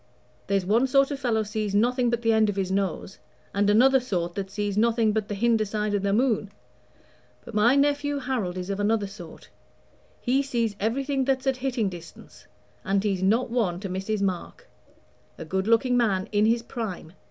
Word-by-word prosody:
There's 195 -1 0
one 230 +7 +3
sort 275 +2 +3
of 280 - -4
fellow 230 -5 0
sees 210 -1 -3
nothing 245 +3 +2
but 235 0 -2
the 225 0 +3
end 220 -1 +3
of 205 - -2
his 190 -1 -2
own 190 - +2
nose, 195 -1 -3 0.3
and 200 +1 +2
another 260 +6 +5
sort 180 -9 -3
that 195 0 -4
sees 205 0 -3
nothing 225 0 +2
but 215 -1 -1
the 205 - -4
hinder 225 +1 +2
side 210 0 -2
of 205 - +1
the 200 0 0
moon; 220 -2 +1 1.0
but - - -10
my 225 +5 +4
nephew 290 0 +1
Harold 245 -9 -3
is 185 +2 -4
of 195 - -3
another 210 0 +1
sort; 195 -5 -11 0.7
he 260 +3 +1
sees 235 -6 -1
everything 270 +5 0
that's 265 0 0
at 265 -1 +1
hitting 255 -4 -1
distance, 175 -3 -11 0.4
and 195 0 0
he's 195 -3 -1
not 225 +6 +1
one 200 -8 0
to 195 - -5
miss 190 +1 -4
his 215 -2 -1
mark. 185 -3 -4 0.7
A - - -7
good 190 +5 -2
looking 230 +2 +3
man 200 -6 +1
in 210 0 +3
his 230 +1 +1
prime! 195 -9 -6
215 Hz, 200 wpm, -25 LUFS, 195-245 Hz, 1.0 s, another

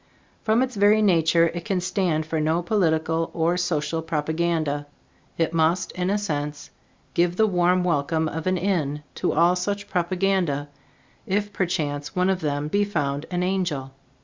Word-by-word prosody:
From 225 +3 +2
its 255 -2 -4
very 210 +2 +5
nature 170 -3 +4
it 170 -1 -5
can 195 -2 -1
stand 180 -3 0
for 160 0 -2
no 160 +3 +1
political 165 -4 +1
or 170 +1 +2
social 165 -2 -1
propaganda. 160 -2 -1 0.5
It 165 0 0
must, 165 +3 +1
in 180 0 -2
a 205 - +2
sense, 150 -7 -4 0.4
give 175 0 +2
the 220 - +4
warm 180 -2 +2
welcome 160 -1 +1
of 160 +2 -4
an 185 0 +2
inn 155 -6 -1
to - - -1
all 170 +3 +4
such 200 +3 -3
propaganda, 175 -5 0 0.6
if 205 +1 -1
perchance 150 -5 -2
one 180 +1 +2
of 185 -1 -2
them 145 -1 -1
be 205 +6 +1
found 145 -7 -2
an 180 0 -1
angel. 175 -8 -1
170 Hz, 160 wpm, -24 LUFS, 155-185 Hz, 0.6 s, very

